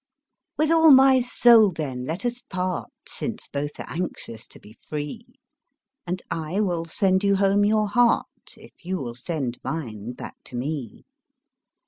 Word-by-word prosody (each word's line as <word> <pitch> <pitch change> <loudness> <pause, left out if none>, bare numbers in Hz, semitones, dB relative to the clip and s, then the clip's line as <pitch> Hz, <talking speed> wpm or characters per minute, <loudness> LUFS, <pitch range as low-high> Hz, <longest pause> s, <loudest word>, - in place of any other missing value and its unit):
With 310 +1 +2
all 325 -1 +6
my 265 -1 +7
soul, 240 -3 +5
then, 135 -6 -4
let 170 - -4
us 240 0 -2
part, 185 +1 -3 0.2
Since 230 -1 -5
both 145 +1 -5
are - - -5
anxious 160 -10 -6
to - - -14
be 105 - -16
free; 150 - -6 0.8
And 180 +1 -3
I 165 +4 -2
will 175 -5 0
sand 190 +3 +1
you 200 0 +3
home 200 +1 +3
your 215 0 +2
heart, 240 +3 0
If - - -18
you 185 +2 -2
will 125 -7 -5
send 125 -1 -4
mine 120 -7 -5
back - - -9
to - - -10
me. 130 -2 -5
180 Hz, 155 wpm, -24 LUFS, 145-215 Hz, 0.8 s, my